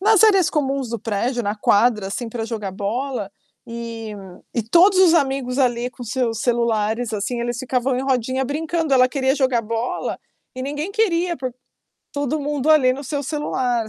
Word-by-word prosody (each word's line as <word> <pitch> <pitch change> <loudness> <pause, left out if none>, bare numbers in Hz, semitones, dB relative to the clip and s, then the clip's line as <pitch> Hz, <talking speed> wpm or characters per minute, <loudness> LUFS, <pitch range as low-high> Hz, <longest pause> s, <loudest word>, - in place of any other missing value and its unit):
nas 435 +1 +5
áreas 390 -5 +5
comuns 275 -3 -1
do 235 0 -3
prédio, 235 +4 -1
na 205 0 -1
quadra, 210 0 +2
assim, 230 +4 -4
pra 225 -1 -4
jogar 215 -4 -4
bola, 210 +2 -3 0.4
e 230 -2 -6 0.4
e 235 - 0
todos 350 - +5
os 365 -3 +6
amigos 270 -4 +1
ali 245 -2 +1
com 245 - -11
seus 235 -1 -1
celulares, 230 -1 0
assim, 235 +4 -2
eles 240 0 -2
ficavam 255 0 0
em 255 - -1
rodinha 260 -1 0
brincando, 315 +2 -1
ela 255 -1 +6
queria 265 +1 +1
jogar 260 -4 +2
bola, 230 +2 -3 0.4
e 255 - -4
ninguém 295 +7 -3
queria 360 -5 +1
por 255 -2 -4 0.6
todo 285 +1 -1
mundo 290 0 -2
ali 270 -5 +5
no 270 +2 -6
seu 285 +2 -3
celular, 255 -6 -1
255 Hz, 175 wpm, -21 LUFS, 230-285 Hz, 0.6 s, os